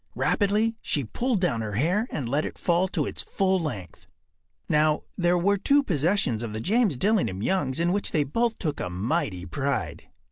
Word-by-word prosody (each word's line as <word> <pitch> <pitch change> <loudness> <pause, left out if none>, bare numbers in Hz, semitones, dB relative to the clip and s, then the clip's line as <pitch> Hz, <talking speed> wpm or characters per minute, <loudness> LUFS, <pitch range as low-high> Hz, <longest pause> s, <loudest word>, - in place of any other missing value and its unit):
Rapidly 215 +2 +1
she 145 - -1
pulled 235 - -1
down 140 -11 +1
her 105 -2 -4
hair 175 - +1
and 135 -6 -3
let 145 +5 0
it - - -6
fall 175 +2 +1
to - - -1
its - - -3
full 190 -1 +1
length. 105 - -6 0.6
Now, 150 0 +2
there 175 -1 +2
were 200 +4 +2
two 285 +7 +4
possessions 160 - +1
of 115 -3 -5
the 110 - -3
James 205 - +1
Dillingham 125 - +1
Youngs 145 -4 0
in 170 +1 +2
which 200 - -1
they 150 - +2
both 230 - 0
took 150 -5 -3
a 90 - -3
mighty 100 - -2
pride. 140 +9 -3
165 Hz, 185 wpm, -26 LUFS, 130-200 Hz, 0.6 s, two